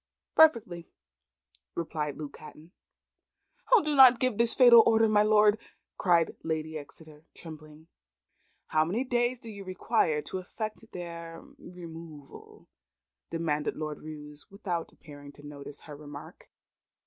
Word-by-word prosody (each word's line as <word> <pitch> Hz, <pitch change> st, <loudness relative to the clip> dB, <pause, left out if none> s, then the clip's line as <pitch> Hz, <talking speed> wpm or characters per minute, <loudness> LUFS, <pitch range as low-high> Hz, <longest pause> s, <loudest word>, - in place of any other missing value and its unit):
"Perfectly," 225 Hz, -, +3 dB, 0.9 s
replied 155 Hz, -3 st, -4 dB
Luke 150 Hz, -2 st, -8 dB
Hatton. 155 Hz, +2 st, -14 dB, 1.0 s
"O, 485 Hz, -5 st, +6 dB
do 300 Hz, -1 st, -1 dB
not 255 Hz, -3 st, +8 dB
give 255 Hz, -4 st, -1 dB
this 235 Hz, 0 st, +4 dB
fatal 240 Hz, -3 st, +8 dB
order, 225 Hz, 0 st, +3 dB
my 210 Hz, -1 st, +3 dB
Lord!" 210 Hz, 0 st, +4 dB, 0.4 s
cried 170 Hz, -3 st, +2 dB
Lady 160 Hz, -1 st, -3 dB
Exeter, 155 Hz, +1 st, -12 dB
trembling. 155 Hz, -1 st, -12 dB, 0.8 s
"How 155 Hz, 0 st, +3 dB
many 195 Hz, +10 st, -2 dB
days 245 Hz, -1 st, 0 dB
do 230 Hz, -3 st, -10 dB
you 200 Hz, -1 st, -9 dB
require 185 Hz, -5 st, 0 dB
to 190 Hz, -, -5 dB
effect 215 Hz, +4 st, -7 dB
their 170 Hz, -1 st, -8 dB, 0.2 s
removal?" 165 Hz, -4 st, -12 dB, 0.6 s
demanded 155 Hz, -3 st, -2 dB
Lord 155 Hz, -1 st, -5 dB
Roos, 150 Hz, -1 st, -10 dB
without 180 Hz, -4 st, -5 dB
appearing 145 Hz, -2 st, -14 dB
to 145 Hz, -, -15 dB
notice 145 Hz, -1 st, -10 dB
her 150 Hz, -, -11 dB
remark. 145 Hz, 0 st, -12 dB
170 Hz, 125 wpm, -28 LUFS, 155-215 Hz, 1.0 s, not